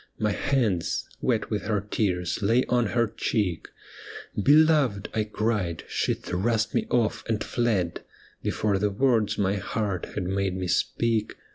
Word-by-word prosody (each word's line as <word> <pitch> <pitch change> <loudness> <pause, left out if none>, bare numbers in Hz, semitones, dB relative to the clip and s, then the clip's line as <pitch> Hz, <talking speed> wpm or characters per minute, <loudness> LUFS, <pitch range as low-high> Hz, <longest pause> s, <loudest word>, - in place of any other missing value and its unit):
My 105 -1 +1
hands, 105 -4 0
wet 115 -3 0
with 105 -1 -2
her 105 -2 +1
tears, 90 -4 0
lay 115 +5 +3
on 120 -2 +2
her 120 +3 +2
cheek. 100 -5 -1 0.4
' - - -7
Beloved! 145 -7 +4
' - - -30
I 110 -1 0
cried, 105 -6 -1
she - - 0
thrust 110 +4 -1
me - - 0
off 115 -3 +1
and 110 -2 0
fled 105 -8 0 0.4
Before 100 -2 0
the 105 +1 +1
words 110 0 +1
my 100 0 +1
heart 100 -1 -2
had 100 - -1
made 95 0 -1
me 90 -1 -2
speak. 110 +3 0
105 Hz, 155 wpm, -26 LUFS, 95-115 Hz, 0.4 s, Beloved